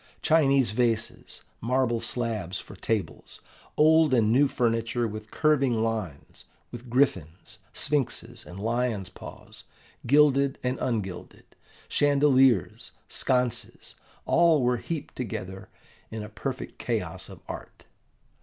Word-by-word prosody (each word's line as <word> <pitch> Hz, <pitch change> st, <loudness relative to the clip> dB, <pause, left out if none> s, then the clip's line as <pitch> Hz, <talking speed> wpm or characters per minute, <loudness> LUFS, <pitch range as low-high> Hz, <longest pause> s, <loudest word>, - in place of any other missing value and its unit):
Chinese 140 Hz, -7 st, +3 dB
vases, 115 Hz, -1 st, -1 dB, 0.2 s
marble 120 Hz, -1 st, +1 dB
slabs 110 Hz, -7 st, -2 dB
for -, -, -11 dB
tables, 105 Hz, +1 st, -3 dB, 0.4 s
old 155 Hz, -2 st, +5 dB
and 110 Hz, -3 st, +3 dB
new 140 Hz, +4 st, +5 dB
furniture 115 Hz, -1 st, 0 dB
with 110 Hz, 0 st, -8 dB
curving 135 Hz, -7 st, +2 dB
lines, 105 Hz, -10 st, -5 dB, 0.3 s
with 120 Hz, +1 st, -9 dB
griffins, 110 Hz, -, -1 dB
sphinxes, 120 Hz, -5 st, -1 dB
and 90 Hz, +2 st, -10 dB
lions' 115 Hz, -3 st, -1 dB
paws, -, -, -12 dB, 0.4 s
gilded 140 Hz, 0 st, +4 dB
and 125 Hz, +1 st, -1 dB
ungilded, 105 Hz, -8 st, -4 dB, 0.4 s
chandeliers, 135 Hz, -, +3 dB
sconces, 125 Hz, -2 st, -1 dB, 0.3 s
all 165 Hz, -5 st, +4 dB
were 125 Hz, 0 st, +2 dB
heaped 155 Hz, +4 st, -6 dB
together 95 Hz, -4 st, -6 dB, 0.4 s
in 110 Hz, -1 st, -6 dB
a 105 Hz, -, -8 dB
perfect 105 Hz, -, -6 dB
chaos -, -, -3 dB
of -, -, -11 dB
art. -, -, -9 dB
120 Hz, 110 wpm, -27 LUFS, 110-135 Hz, 0.4 s, old